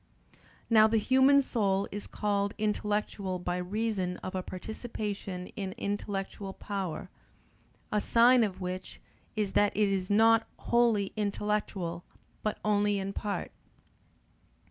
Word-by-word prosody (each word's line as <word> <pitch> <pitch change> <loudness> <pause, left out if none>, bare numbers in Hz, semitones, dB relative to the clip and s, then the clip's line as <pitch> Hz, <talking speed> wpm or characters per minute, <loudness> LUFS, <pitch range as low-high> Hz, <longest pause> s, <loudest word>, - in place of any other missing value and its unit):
Now 220 -2 +6
the 225 +1 +2
human 265 +5 +5
soul 200 -6 +1
is 205 +1 -6
called 200 -1 -1
intellectual 210 -2 -1
by 180 0 -2
reason 185 -1 -1
of 185 - -4
a 185 - -1
participation 200 -1 -5
in 195 -2 -4
intellectual 200 -1 -3
power; 190 -7 -4 0.8
a 210 - +2
sign 240 +2 +5
of 195 -4 -2
which 185 +1 -5 0.4
is 210 -3 0
that 205 0 +2
it 210 -1 +3
is 190 -1 -1
not 225 +2 +5
wholly 230 -5 +2
intellectual 205 -4 -2 0.4
but 215 - -1
only 205 -1 +2
in 195 0 -3
part. 205 0 -3
205 Hz, 120 wpm, -30 LUFS, 190-215 Hz, 0.8 s, Now